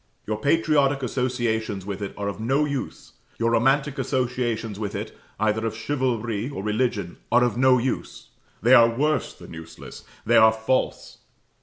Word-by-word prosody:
Your 105 0 -3
patriotic 145 -1 +2
associations 120 -6 -2
with 100 0 -5
it 100 - -5
are 100 0 -3
of 100 - -4
no 135 +7 +1
use; 140 -3 -5 0.2
your 115 0 +1
romantic 135 +4 +2
associations 120 -5 -2
with 105 -2 -4
it - - -5 0.2
either 110 +1 +1
of 115 -1 -2
chivalry 120 -3 -2
or 100 -9 -6
religion 105 -4 -1
are 120 +1 +5
of 120 -4 +1
no 130 +1 +4
use; 125 +1 -4 0.3
they 120 +3 +5
are 115 -2 +8
worse 150 +6 0
than - - -12
useless, 80 0 -11 0.2
they - - +4
are 110 0 +7
false. 110 +4 -2
120 Hz, 160 wpm, -24 LUFS, 110-130 Hz, 0.3 s, are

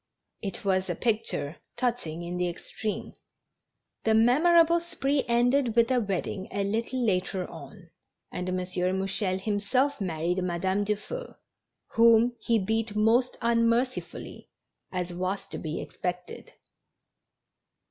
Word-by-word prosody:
It' 200 -1 -5
was 190 -1 +1
a 175 - 0
picture 215 -8 -1 0.2
touching 235 -10 -1
in 175 +1 -4
the 180 0 +1
extreme. 210 +4 -5 0.9
The 220 0 +3
memorable 330 +9 +5
spree 285 -5 -1
ended 240 0 +2
with 235 +1 +4
a 255 - +4
wedding 195 -1 -3
a 200 0 -1
little 230 +5 -1
later 185 -2 0
on, 170 +1 -12 0.4
and 180 0 -3
M. 185 - 0
Mouchel 185 +1 -1
himself 220 +7 0
married 175 0 -1
Madame 185 +3 0
Dufeu, 215 - -4 0.5
whom 230 +1 +5
he 230 - +2
beat 220 +1 -1
most 230 +4 +3
unmercifully, 235 +2 0 0.4
as 180 -1 -3
was 185 +3 -2
to - - -5
bo 160 - -5
expected. 180 0 -5
210 Hz, 120 wpm, -28 LUFS, 185-240 Hz, 0.9 s, memorable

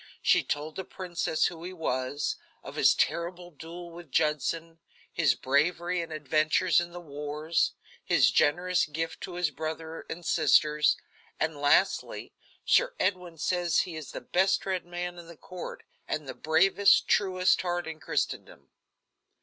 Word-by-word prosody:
She - - +4
told 150 +2 -4
the 190 - -3
princess 175 -4 -1
who 165 -1 -3
he 180 +1 -6
was; 140 -4 -2 0.3
of - - -8
his - - +5
terrible 175 +1 -1
duel 170 +2 -9
with 170 -2 -11
Judson; 165 +2 0 0.3
his 150 -8 +3
bravery 170 +7 +1
and 165 -1 -7
adventures 155 +4 +2
in 175 0 -6
the 175 - -8
wars; 150 +1 -1 0.3
his - - +4
generous 175 +4 +2
gift 165 +2 -4
to 180 - -6
his 175 -3 0
brother 160 +2 -6
and 170 +1 -6
sisters, 150 -1 +3 0.4
and 160 0 0
lastly, 145 +7 +2 0.3
"Sir - - +3
Edwin 180 -3 -1
says 175 +2 +1
he 175 -3 -6
is 155 -4 -7
the - - -6
best 190 +9 +1
read 185 -2 -2
man 175 0 -5
in 170 - -11
the 170 -1 -12
court, 180 -1 -8 0.2
and 150 -2 -3
the 130 - -5
bravest, 195 +7 +4
truest 185 -2 +3
heart 175 -1 -2
in 160 -1 -7
Christendom." 70 - -3
165 Hz, 150 wpm, -28 LUFS, 155-175 Hz, 0.4 s, his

